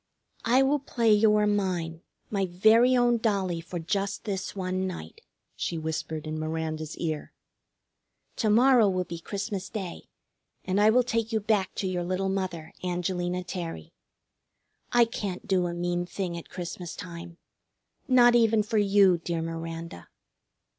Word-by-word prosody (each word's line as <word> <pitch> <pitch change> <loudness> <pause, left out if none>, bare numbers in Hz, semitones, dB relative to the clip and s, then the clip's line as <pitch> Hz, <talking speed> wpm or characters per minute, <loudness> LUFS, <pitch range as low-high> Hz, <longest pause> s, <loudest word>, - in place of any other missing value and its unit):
"I 250 +4 +5
will 285 +2 +2
play 235 -5 +2
you 210 0 +5
are 210 0 +3
mine, 180 -5 -1 0.3
my 195 -2 0
very 220 +8 +5
own 240 -1 +3
dollie, 195 -6 0
for 175 +1 -6
just 195 +4 -2
this 195 -2 -4
one 185 0 -2
night," 80 - -8 0.3
she 170 - -3
whispered 160 0 -4
in 155 0 -4
Miranda's 155 0 -3
ear. 155 -3 -3 1.0
"To 220 - +1
morrow 240 0 +5
will 185 -1 0
be 170 -1 -7
Christmas 200 +1 -4
Day, 190 -6 -6 0.6
and 190 +2 +1
I 210 - +6
will 250 +3 +4
take 230 -1 -1
you 220 - +1
back 205 -3 0
to 195 - -2
your 180 -1 -1
little 185 +2 -1
mother, 180 -4 -3
Angelina 180 0 -2
Terry. 170 - -6 1.0
I 240 -1 +6
can't 205 -3 -5
do 185 -3 +2
a 170 - -3
mean 175 0 -1
thing 180 -1 -4
at 170 - -8
Christmas 175 -1 -6
time, 170 -1 -9 0.7
not 245 -2 +6
even 225 -2 +4
for 220 0 0
you, 195 -3 +4
dear 170 -1 -3
Miranda." 165 - -6
185 Hz, 155 wpm, -27 LUFS, 170-215 Hz, 1.0 s, I